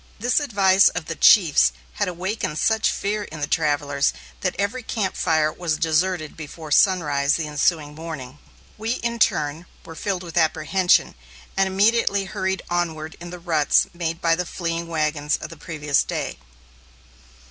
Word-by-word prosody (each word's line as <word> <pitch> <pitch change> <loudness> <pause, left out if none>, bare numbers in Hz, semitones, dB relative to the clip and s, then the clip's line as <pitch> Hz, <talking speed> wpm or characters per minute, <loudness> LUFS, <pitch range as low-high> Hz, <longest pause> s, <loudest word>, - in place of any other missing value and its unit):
This 245 +6 +2
advice 200 -8 +4
of 180 -2 -5
the - - -4
chiefs 155 - +5 0.2
had - - -1
awakened 180 -2 -3
such 220 +4 +2
fear 205 +1 -2
in 155 - -9
the 145 - 0
travellers 145 -2 0 0.3
that 185 - -2
every 205 +7 -1
camp 215 -5 -2
fire 155 -1 +1
was 165 -3 -2
deserted 160 0 0
before 155 0 -9
sunrise 145 -5 +3
the 165 - -2
ensuing 150 0 0
morning. 150 -4 -8 0.4
We, 225 +2 -1
in 235 0 -2
turn, 155 -3 +1 0.2
were 165 - -9
filled 185 +2 -3
with 170 -1 -7
apprehension, 165 +3 +2 0.4
and 195 0 +2
immediately 200 +1 +2
hurried 190 0 -2
onward 160 -3 -2
in 175 +1 -8
the 180 - -7
ruts 165 -4 +2
made 165 -1 -3
by 165 -1 +3
the 180 +1 -1
fleeing 170 -1 -3
wagons 155 -2 0
of - - -8
the - - -9
previous 150 -5 0
day. - - -4
170 Hz, 160 wpm, -23 LUFS, 155-190 Hz, 0.4 s, chiefs